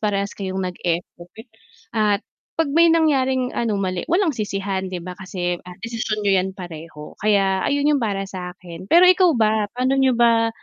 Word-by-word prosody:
parehas 200 -1 -1
kayong 190 -1 -4
nag-effort 175 -1 -4 0.6
at 210 -2 +1 0.3
'pag 325 -2 +1
may 335 +2 +5
nangyaring 265 -6 +2
ano, 225 -3 -1
mali, 185 - -3
walang 350 -1 +2
sisihan, 195 -4 -3
'di 180 -2 -6
ba, 180 - -6
kasi, 180 -2 -4
ah, 180 - -10
desisyon 225 -2 -3
niyo 195 -2 +4
'yan 185 - -2
pareho, 160 -4 -9
kaya 195 -2 +2
ayun 285 0 0
'yong 285 - +1
para 200 -4 -1
sa 180 -2 -7
'kin. 175 +1 -11
Pero 345 +2 +7
ikaw 365 -4 +5
ba? 215 -2 +2
Pa'no 260 +2 +1
niyo 260 -2 +3
ba 230 -1 +4
205 Hz, 175 wpm, -21 LUFS, 185-255 Hz, 0.6 s, Pero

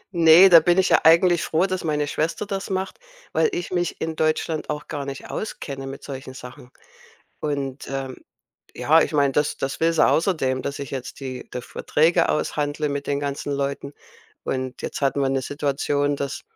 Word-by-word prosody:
Ne, 165 +2 +8
da 170 -2 +10
bin 175 +3 +2
ich 190 - +3
ja - - +5
eigentlich 170 +1 +5
froh, 165 +4 +1
dass 185 -1 -3
meine 150 -2 0
Schwester 160 +7 -2
das 195 -1 -4
macht, 190 0 -3 0.3
weil 460 - +2
ich 355 -1 -4
mich 175 -2 -1
in 160 0 -3
Deutschland 155 0 -1
auch 150 -1 -4
gar 145 -3 -4
nicht 135 0 -7
auskenne 135 -10 -5
mit 135 +1 -8
solchen 130 -1 -8
Sachen. 125 -1 -11 0.7
Und, 140 -2 -4
ähm, 135 -1 -4 0.6
ja, 160 +2 +4
ich - - -4
meine 140 -2 +2
das 150 +1 0
das 135 +1 -3
will 165 +1 +2
sie 165 - +4
außerdem, 145 -7 +1
dass 140 - -4
ich 140 -3 -6
jetzt 130 -2 -6
die 130 -2 -7
de 125 - -4
Verträge 165 +6 +1
aushandle 150 0 -1
mit 140 0 -3
den 140 0 -1
ganzen 145 0 -4
Leuten. 140 0 -3 0.5
Und 130 -1 -3
jetzt - - -5
hatten 140 0 +1
wir 135 - +1
'ne 135 0 -1
Situation, 145 0 -1
dass 140 -1 -4
145 Hz, 190 wpm, -23 LUFS, 135-165 Hz, 0.7 s, da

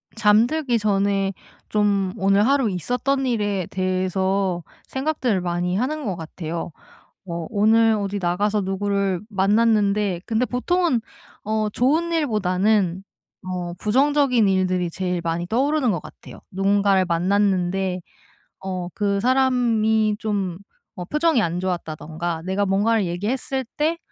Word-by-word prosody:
잠들기 235 +5 +3
전에 200 -1 +1 0.4
좀 200 -3 +1
오늘 195 +1 +3
하루 270 -5 +3
있었던 250 +8 -1
일에 205 -6 0
대해서 185 -1 -1 0.2
생각들을 265 - -1
많이 175 0 -1
하는 280 +7 -2
것 195 - -2
같아요. 165 0 -6 0.6
어 170 -1 -4
오늘 225 +1 +4
어디 200 0 -3
나가서 205 +4 0
누구를 195 -1 -1
만났는데 205 -2 +2
근데 235 +2 +1
보통은 265 0 0 0.4
어 215 0 0
좋은 305 +10 +1
일보다는 205 - +1 0.4
어 180 -1 -4
부정적인 255 +2 +2
일들이 185 -2 +1
제일 180 0 -2
많이 170 +1 -2
떠오르는 265 - +1
것 175 -5 -2
같아요. - - -13
누군가를 195 0 +2
만났는데 185 +1 +1 0.6
어 185 -2 -3
그 200 -1 0
사람이 230 -4 +2
좀 195 -5 -2 0.4
뭐 180 - -4
표정이 300 - +2
안 175 -1 -1
좋았다든가 165 -2 -4
내가 190 +2 0
뭔가를 205 +1 +2
얘기했을 245 +9 -2
때 320 +3 0
200 Hz, 275 characters per minute, -22 LUFS, 185-230 Hz, 0.6 s, 오늘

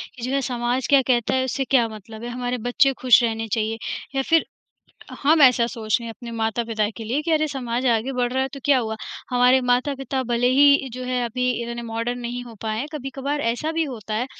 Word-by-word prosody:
कि 250 - -12
जो 255 - -2
है 275 - +1
समाज 245 0 -1
क्या 280 -2 +6
कहता 240 -3 +2
है 260 - +2
उससे 265 +1 -1
क्या 245 -4 +4
मतलब 220 +1 -10
है? 240 - -4
हमारे 245 0 -3
बच्चे 245 +3 +2
खुश 250 -1 +6
रहने 225 -1 -1
चाहिए 220 0 -1 0.4
या 270 - +2
फिर, 325 +4 +2 0.8
हम 305 +2 +4
ऐसा 250 -3 +6
सोच 220 -3 -1
रहे 235 - -7
हैं 225 - -5
अपने 240 -1 -8
माता-पिता 225 -1 -1
के 225 - -7
लिए 250 +7 -1
कि 330 - -3
अरे! 310 0 +2
समाज 250 -2 -3
आगे 230 +4 0
बढ़ 245 -1 -1
रहा 260 +1 +1
है, 265 - -1
तो 275 - -10
क्या 280 -2 +4
हुआ? 220 -2 -3 0.3
हमारे 250 +1 +4
माता-पिता 260 +1 0
भले 240 0 0
ही 280 +1 +5
जो 255 +1 -6
है 250 -1 -1
अभी 250 +2 -1
इतने 235 0 -5
मॉडर्न 230 +1 -3
नहीं 245 0 -4
हो 235 -2 -11
पाए 215 -1 -2
हैं 265 - -2
कभी-कभार 280 0 -4
ऐसा 245 +7 -1
भी 325 0 0
होता 220 -6 -6
है, 235 +4 -1
245 Hz, 230 wpm, -23 LUFS, 230-270 Hz, 0.8 s, क्या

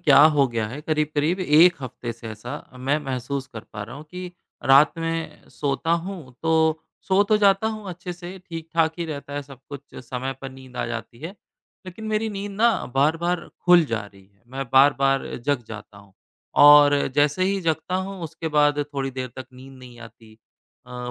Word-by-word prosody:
क्या 145 -5 +6 0.2
हो 140 -2 +4
गया 115 -2 -2
है। 140 +6 -7
करीब-करीब 155 +3 0
1 170 +1 +5
हफ्ते 120 -1 -6
से 115 0 -10
ऐसा 110 +3 -8 0.3
मैं 135 +4 0
महसूस 135 +1 -3
कर 110 - -7
पा 105 - -5
रहा 115 +5 -9
हूँ 145 - -10
कि 180 0 -7 0.3
रात 140 +3 +6
में 165 0 -4
सोता 145 +3 -2
हूँ, 170 -6 -4
तो 160 -1 +2 0.3
सो 190 +1 +5
तो 215 +1 +3
जाता 200 0 +3
हूँ 215 -3 -6
अच्छे 180 0 -6
से, 175 +2 -9
ठीक-ठाक 165 -2 -2
ही 170 - -2
रहता 145 -3 -7
है 145 - -3
सब 135 -2 -14
कुछ, 140 -1 -8
समय 130 +1 -5
पर 135 - -7
नींद 130 -1 -14
आ - - -1
जाती 115 0 -6
है। 165 +6 -7 0.5
लेकिन 185 +4 -9
मेरी 215 +1 0
नींद 205 0 -5
ना 220 +4 +3 0.3
बार-बार 165 +5 +1 0.2
खुल 175 -2 +7
जा 115 -5 -2
रही 100 -1 -18
है 100 0 -35
मैं 135 0 -3
बार-बार 135 0 +4 0.2
जग 145 -4 +1
जाता 105 -1 -10
हूँ। 100 -1 -19 0.5
और 145 -1 +7
जैसे 145 +4 +2
ही 195 +1 0
जगता 165 +1 -1
हूँ 195 -2 -8
उसके 160 +1 -5
बाद 145 0 +4 0.2
थोड़ी 135 -1 -2
देर 130 0 -5
तक 130 -1 -7
नींद 130 +1 -13
नहीं 125 -2 -13
आती। 115 -1 -14 0.5
अ, 125 0 -6
145 Hz, 190 wpm, -23 LUFS, 130-170 Hz, 0.5 s, खुल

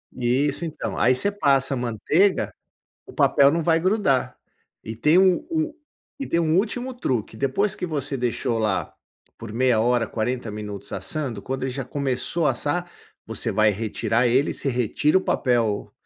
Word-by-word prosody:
Isso 130 +7 0
então, 155 - -5
aí 125 +2 +4
você 200 +10 +1
passa 140 -7 +2
manteiga, 125 - +1 0.5
o - - -12
papel 140 0 +4
não 165 +1 0
vai 165 0 +2
grudar. 160 - +1 0.5
E 110 - -5
tem 150 +10 +3
um 190 - +4
um 315 -1 -1 0.4
,e 275 - -4
tem 170 - 0
um 160 +1 +2
último 245 +5 -1
truque, 120 - -2
depois 190 - 0
que 180 - -4
você 145 -3 -3
deixou 120 -1 -1
lá 105 -3 -1 0.4
por 115 -2 -9
meia 120 -2 +2
hora, 120 0 +2
40 120 0 -3
minutos 105 -1 -7
assando, 135 -10 -3
quando 130 0 -4
ele 130 - -2
já 135 -1 -4
começou 140 +4 -1
a - - +4
assar, 175 +4 -2 0.4
você - - -3
vai 110 0 +3
retirar 115 +3 0
ele, 130 +5 +2
você 140 - -2
retira 125 - +2
o - - -4
papel 115 - 0
135 Hz, 170 wpm, -23 LUFS, 120-165 Hz, 0.5 s, aí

